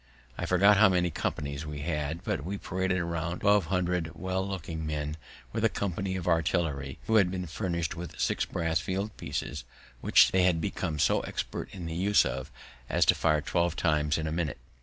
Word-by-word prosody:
I -, -, -3 dB
forget 100 Hz, +3 st, +5 dB
how 110 Hz, 0 st, +7 dB
many 90 Hz, -2 st, +2 dB
companies 70 Hz, -1 st, -3 dB
we 75 Hz, -2 st, -6 dB
had, 75 Hz, +1 st, -2 dB
but -, -, -2 dB
we 100 Hz, +5 st, -3 dB
paraded 95 Hz, 0 st, -1 dB
about 85 Hz, +1 st, -3 dB
twelve 100 Hz, -2 st, +4 dB
hundred 90 Hz, -3 st, 0 dB
well 95 Hz, +1 st, -2 dB
looking 85 Hz, -4 st, -4 dB
men, 75 Hz, -1 st, -3 dB, 0.4 s
with -, -, -1 dB
a -, -, +5 dB
company 95 Hz, -1 st, -2 dB
of 90 Hz, -2 st, -4 dB
artillery, 80 Hz, -5 st, 0 dB
who 110 Hz, -, +3 dB
had 100 Hz, -4 st, +5 dB
been 90 Hz, 0 st, -3 dB
furnished 85 Hz, -2 st, -2 dB
with 85 Hz, -2 st, -8 dB
six -, -, +1 dB
brass 80 Hz, -1 st, -1 dB
field 95 Hz, +6 st, -3 dB
pieces, -, -, -4 dB, 0.4 s
which -, -, +5 dB
they 95 Hz, -, +3 dB
had 90 Hz, -2 st, +3 dB
become 85 Hz, -3 st, -2 dB
so -, -, +3 dB
expert -, -, -4 dB
in 90 Hz, -3 st, -7 dB
the 80 Hz, -, -4 dB
use 100 Hz, +5 st, +3 dB
of 65 Hz, +3 st, -3 dB, 0.4 s
as -, -, +3 dB
to -, -, +6 dB
fire 75 Hz, -2 st, +2 dB
twelve 85 Hz, +2 st, 0 dB
times 75 Hz, -3 st, +1 dB
in 80 Hz, -, -2 dB
a 80 Hz, -, -2 dB
minute. 80 Hz, -4 st, -2 dB
85 Hz, 195 wpm, -29 LUFS, 80-95 Hz, 0.4 s, how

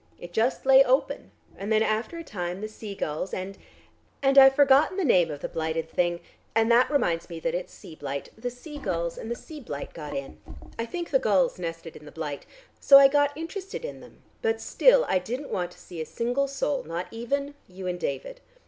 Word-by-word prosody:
It 175 Hz, 0 st, -10 dB
just 235 Hz, +7 st, 0 dB
lay 270 Hz, 0 st, +8 dB
open, 260 Hz, +1 st, 0 dB, 0.3 s
and 200 Hz, +3 st, -5 dB
then 220 Hz, 0 st, +4 dB
after 220 Hz, +9 st, -1 dB
a 335 Hz, -, -6 dB
time 180 Hz, -, -5 dB
the 215 Hz, -, -3 dB
sea 215 Hz, -1 st, -8 dB
gulls 155 Hz, +2 st, -3 dB
and 190 Hz, +1 st, -5 dB, 0.7 s
and 270 Hz, 0 st, +3 dB
I've 270 Hz, -1 st, +9 dB
forgotten 285 Hz, +6 st, +5 dB
the 385 Hz, -, +1 dB
name 180 Hz, -, +4 dB
of 145 Hz, -2 st, -6 dB
the -, -, -3 dB
blighted 160 Hz, 0 st, -2 dB
thing, 175 Hz, -1 st, 0 dB, 0.3 s
and 225 Hz, +1 st, +3 dB
that 240 Hz, +2 st, +5 dB
reminds 175 Hz, -, 0 dB
me 165 Hz, -1 st, -6 dB
that -, -, -1 dB
it's 180 Hz, +1 st, -4 dB
sea 160 Hz, -, -12 dB
blite 140 Hz, -2 st, -5 dB
the 245 Hz, +3 st, -4 dB
sea 290 Hz, +5 st, -10 dB
gulls 170 Hz, -7 st, -2 dB
and 225 Hz, -, -7 dB
the 235 Hz, -, -2 dB
sea 310 Hz, +5 st, -10 dB
blite 145 Hz, -, -7 dB
got 150 Hz, -3 st, -7 dB
in; 140 Hz, 0 st, -7 dB, 0.4 s
I 230 Hz, -, -2 dB
think 345 Hz, +5 st, -5 dB
the 270 Hz, -, +4 dB
gulls 195 Hz, -6 st, +2 dB
nested 165 Hz, -1 st, -6 dB
in 150 Hz, -, -12 dB
the 150 Hz, -, -11 dB
blite. 150 Hz, -3 st, -6 dB, 0.3 s
So 275 Hz, -, +8 dB
I 275 Hz, 0 st, +8 dB
got 290 Hz, 0 st, +2 dB
interested 380 Hz, +7 st, -6 dB
in -, -, -7 dB
them, -, -, -16 dB, 0.2 s
but 450 Hz, -1 st, 0 dB
still -, -, +4 dB
I 185 Hz, -, +2 dB
didn't 250 Hz, +10 st, -5 dB
want 180 Hz, -2 st, -1 dB
to -, -, -20 dB
see 170 Hz, -3 st, -8 dB
a -, -, -3 dB
single 245 Hz, +4 st, -1 dB
soul, 275 Hz, 0 st, -2 dB
not 170 Hz, +3 st, -4 dB
even 280 Hz, +5 st, -2 dB
you 185 Hz, 0 st, -9 dB
and 180 Hz, -1 st, -2 dB
David. -, -, -4 dB
220 Hz, 220 wpm, -26 LUFS, 175-275 Hz, 0.7 s, I've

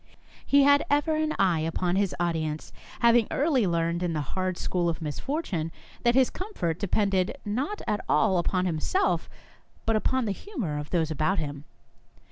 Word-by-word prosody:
He 280 Hz, 0 st, +5 dB
had 285 Hz, +1 st, +5 dB
ever 290 Hz, +2 st, +2 dB
an 310 Hz, 0 st, 0 dB
eye 180 Hz, -4 st, +3 dB
upon 170 Hz, +3 st, -1 dB
his 200 Hz, -1 st, +1 dB
audience, 160 Hz, -3 st, -2 dB, 0.3 s
having 235 Hz, -2 st, +5 dB
early 275 Hz, -, +2 dB
learned 170 Hz, 0 st, 0 dB
in 175 Hz, -2 st, -1 dB
the 155 Hz, -, -1 dB
hard 185 Hz, -1 st, -1 dB
school 175 Hz, -2 st, 0 dB
of 165 Hz, -, -3 dB
misfortune 165 Hz, -, -3 dB, 0.3 s
that 240 Hz, 0 st, +3 dB
his 260 Hz, -1 st, +4 dB
comfort 180 Hz, -, -3 dB
depended 195 Hz, +2 st, +1 dB
not 265 Hz, -, -2 dB
at 210 Hz, -, -1 dB
all 190 Hz, -5 st, +3 dB
upon 180 Hz, +1 st, 0 dB
him 165 Hz, -4 st, -1 dB
self, 380 Hz, -, 0 dB, 0.6 s
but 225 Hz, -, +2 dB
upon 255 Hz, +3 st, +1 dB
the 210 Hz, -, 0 dB
humour 195 Hz, -, -4 dB
of 150 Hz, -, -7 dB
those 160 Hz, -3 st, 0 dB
about 155 Hz, +6 st, +1 dB
him. 145 Hz, -2 st, -4 dB
190 Hz, 170 wpm, -27 LUFS, 165-260 Hz, 0.6 s, He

